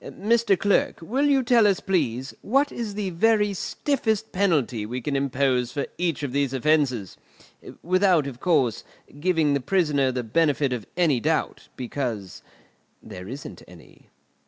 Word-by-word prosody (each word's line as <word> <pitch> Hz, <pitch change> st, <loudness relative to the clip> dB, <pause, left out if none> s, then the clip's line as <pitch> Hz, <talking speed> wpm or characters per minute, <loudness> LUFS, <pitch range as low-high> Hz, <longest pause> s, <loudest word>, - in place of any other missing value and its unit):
Mr. 220 Hz, -1 st, +1 dB
Clerk, 200 Hz, +3 st, +1 dB
will 260 Hz, -, 0 dB
you 275 Hz, -2 st, +3 dB
tell 235 Hz, -3 st, +4 dB
us, 195 Hz, -3 st, +2 dB
please, 135 Hz, -, -1 dB
what 275 Hz, +6 st, +1 dB
is 220 Hz, -4 st, -5 dB
the 200 Hz, -3 st, -3 dB
very 210 Hz, +3 st, +2 dB
stiffest 220 Hz, 0 st, -2 dB
penalty 155 Hz, -, +1 dB
we 120 Hz, +4 st, -4 dB
can 140 Hz, +3 st, -3 dB
impose 130 Hz, -2 st, 0 dB
for 140 Hz, -, -2 dB
each 170 Hz, -4 st, -1 dB
of 140 Hz, -, -3 dB
these 140 Hz, -1 st, 0 dB
offences? 135 Hz, -, 0 dB, 0.7 s
Without, 185 Hz, -3 st, +3 dB
of 130 Hz, -3 st, -7 dB
course, 135 Hz, -, +1 dB, 0.4 s
giving 160 Hz, -3 st, +2 dB
the 140 Hz, -, +1 dB
prisoner 145 Hz, -4 st, +1 dB
the 125 Hz, -1 st, -3 dB
benefit 145 Hz, +2 st, +1 dB
of 120 Hz, -4 st, -5 dB
any 160 Hz, -8 st, +3 dB
doubt, -, -, -1 dB
because 120 Hz, -6 st, -5 dB, 0.6 s
there 90 Hz, 0 st, -9 dB
isn't 135 Hz, +5 st, -8 dB
any." -, -, -18 dB
150 Hz, 150 wpm, -24 LUFS, 130-200 Hz, 0.7 s, tell